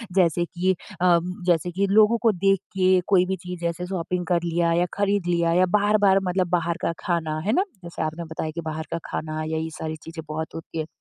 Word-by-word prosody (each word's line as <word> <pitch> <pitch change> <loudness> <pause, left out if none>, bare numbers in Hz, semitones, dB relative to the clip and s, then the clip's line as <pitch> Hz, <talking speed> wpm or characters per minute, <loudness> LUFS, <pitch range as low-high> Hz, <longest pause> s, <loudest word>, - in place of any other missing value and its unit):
जैसे 175 -2 +3
कि 185 +2 0 0.3
अ, 175 -2 +5 0.3
जैसे 175 0 +2
कि 195 +3 0
लोगों 215 +3 +5
को 230 - +4
देख 195 0 +2 0.2
के 185 0 +4
कोई 185 -3 +4
भी 190 +1 -1
चीज़ 180 -1 -6
जैसे 170 +1 -2
शॉपिंग 180 -1 -2
कर 175 -1 +1
लिया 170 0 +1
या 175 +1 +2
ख़रीद 200 -2 +1
लिया 170 -1 +2
या 180 +2 +4
बार-बार 205 -1 +4
मतलब 180 -1 0
बाहर 170 -1 0
का - - 0
खाना 160 -3 -1
है 215 - +2
ना, 370 - +3 0.2
जैसे 170 - -6
आपने 155 +2 -3
बताया 160 0 -4
कि 170 - -3
बाहर 155 0 -4
का 165 - -1
खाना 155 0 -4
या 160 0 -2
ये 160 0 -2
सारी 160 0 -3
चीज़ें 165 -1 -8
बहुत 160 +1 -5
होती 165 0 -6
हैं। 155 - -3
175 Hz, 225 wpm, -24 LUFS, 165-185 Hz, 0.3 s, अ